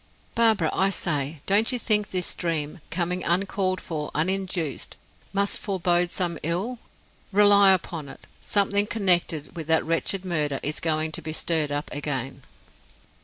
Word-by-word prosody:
"Barbara, 220 -8 +3
I 190 +1 +2
say, 150 -5 -2
don't 210 +5 +4
you 250 - +1
think 210 -3 +1
this 180 -2 -1
dream, 165 -1 -3
coming 180 +1 -2
uncalled 185 +1 0
for 150 -3 -5
uninduced, 180 -2 -1 0.3
must 200 0 0
forebode 175 -3 +1
some 175 -3 -2
ill? 190 +10 -2 0.5
Rely 200 -1 +6
upon 170 -5 -1
it, - - -12 0.2
something 200 0 +3
connected 175 -8 +1
with 160 -3 -6
that 160 0 +3
wretched 175 +4 -1
murder 150 -6 -1
is 150 +1 -2
going 155 -1 0
to 170 - -3
be 155 0 -5
stirred 160 -2 +1
up 145 +1 -2
again." 135 -2 -4
175 Hz, 145 wpm, -25 LUFS, 155-195 Hz, 0.5 s, Rely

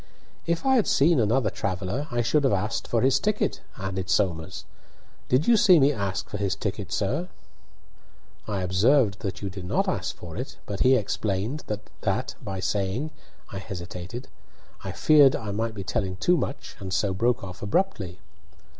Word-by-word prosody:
"If 170 +6 0
I 265 -1 +5
had 225 - +2
seen 155 +1 +4
another 115 -1 +2
traveller 100 +10 -2
I 120 -3 0
should 145 +6 +2
have 135 - +3
asked 105 +4 -1
for 115 - +1
his 130 0 +4
ticket," 210 0 0 0.2
added 95 -1 -4
Somers. 85 -6 0 0.6
"Did 130 +4 +3
you 235 - +7
see 185 -5 +7
me 140 +1 +5
ask 100 -5 -2
for - - -5
his 100 -1 0
ticket, 100 -1 -4
sir?" 140 - -1 1.2
"I 100 -3 -2
observed 100 +3 +3
that 95 -2 -5
you 100 - -2
did 95 -1 -7
not - - +1
ask - - -2
for 85 -2 -9
it, 125 +4 -6
but 100 -2 -5
he 130 +1 +5
explained 110 +4 -1
that 105 0 -5 0.5
by 95 -4 -4
saying 100 +10 -1 0.2
" - - -25
I 95 - -3
hesitated. 95 +5 -7 0.6
I - - -4
feared 145 -4 +6
I 110 -3 -4
might 110 +2 -2
be 100 - -5
telling 95 -1 -1
too 175 - +3
much, 140 -4 -4
and 95 -1 -6
so 95 +1 +1
broke 120 +5 +1
off 90 -1 -8
abruptly. 100 - -1
105 Hz, 175 wpm, -26 LUFS, 95-135 Hz, 1.2 s, you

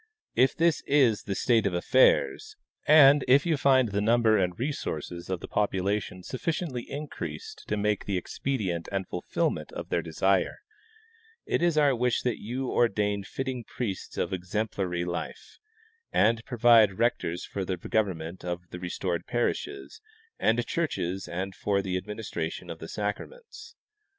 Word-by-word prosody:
If 130 +1 +3
this 165 -3 +3
is 130 -7 +3
the 100 - -2
state 115 -2 +2
of 90 - -2
affairs, 130 - +3 0.3
and 145 -2 +8
if 135 +2 +5
you 165 -2 +2
find 130 -4 +4
the 100 +1 -1
number 115 0 +4
and 90 -3 0
resources 90 - -4
of 95 -2 -2
tlie - - -9
population 100 -2 -1
sufficiently 135 - -3
increased 155 - -6
to 105 - -1
make 105 0 -1
expedient 95 -2 -2
the 95 -1 -1
fulfillment 90 - -2
of - - -6
their - - +1
desire, 95 +4 +1 0.9
it - - 0
is 170 -2 +2
our 145 -3 +4
wish 125 0 0
that 125 -3 -1
you 125 +4 -3
ordain 105 -3 +1
fitting 130 +3 -4
priests 105 -3 -5
of - - -1
exemplary 90 -1 -2
life, 85 0 -6 0.5
and 115 +1 +3
provide 115 -5 +5
rectors 90 -7 0
for 100 - -4
the 95 0 -2
government 90 -3 -2
of 90 0 -4
the 90 - -6
restored 90 0 -3
parishes 400 - -2 0.4
and 115 +2 +2
churches 95 - -2
and 95 +3 -4
for 100 0 0
the 95 -1 -2
administration 95 -4 -4
of - - -8
the - - -7
sacraments. 450 - -6
105 Hz, 145 wpm, -28 LUFS, 95-130 Hz, 0.9 s, and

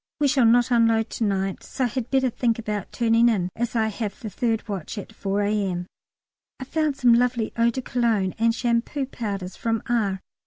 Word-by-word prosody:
We 290 - +3
shall 265 -3 +3
not 240 +2 +4
unload 230 -1 +3
to - - -2
night, 195 -2 -1
so 265 - -4
I - - +3
had 245 0 -4
better 265 -2 +2
think 230 -1 0
about 210 -4 -4
turning 230 0 +3
in, 185 -6 0
as 240 +1 -3
I 220 -1 +2
have 215 0 -5
the 220 -6 -6
third 225 +2 -1
watch 200 0 -5
at 205 - -7
4 200 +1 -1
A.M. 195 -4 -1 0.7
I - - -5
found 300 +1 -1
some 245 -2 +5
lovely 240 -1 +1
eau 230 0 +3
de 255 +2 -4
Cologne 225 -7 0
and 230 0 +3
shampoo 240 +4 0
powders 200 -8 -5
from 225 -1 -1
R. 210 -5 0
230 Hz, 200 wpm, -24 LUFS, 205-245 Hz, 0.7 s, some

